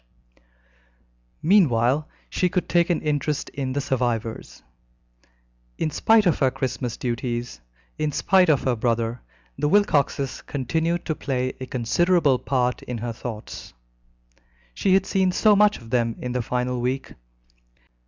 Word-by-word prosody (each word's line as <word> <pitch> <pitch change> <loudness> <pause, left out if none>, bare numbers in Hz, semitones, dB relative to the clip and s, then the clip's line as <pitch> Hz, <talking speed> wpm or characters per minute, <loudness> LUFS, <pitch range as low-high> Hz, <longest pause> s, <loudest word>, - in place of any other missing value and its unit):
Meanwhile, 150 - +3 0.2
she 180 - 0
could 180 -1 -1
take 170 0 +2
an 175 - +1
interest 150 -1 -1
in 135 -2 -4
the 140 - -1
survivors. 120 - -3 1.1
In 155 - -1
spite 220 +4 +4
of 175 - +2
her 135 - +4
Christmas 130 -2 -3
duties, 120 - -3 0.4
in 155 -1 0
spite 185 +4 +3
of 145 -4 +3
her 130 -2 +1
brother, 115 +1 -1 0.4
the 150 - +1
Wilcoxes 145 -8 +1
continued 160 +5 -2
to 155 - -1
play 130 -4 -2
a 130 - -6
considerable 145 +3 +2
part 125 -2 0
in 125 - -5
her 115 +1 -4
thoughts. 110 - -8 1.0
She 190 - +2
had 190 0 +2
seen 190 -1 +1
so 210 +3 +4
much 210 +1 +4
of 115 0 -14
them 115 -2 +1
in 125 - -4
the 125 0 -1
final 125 +1 -2
week. 130 +2 -2
135 Hz, 140 wpm, -24 LUFS, 125-165 Hz, 1.1 s, spite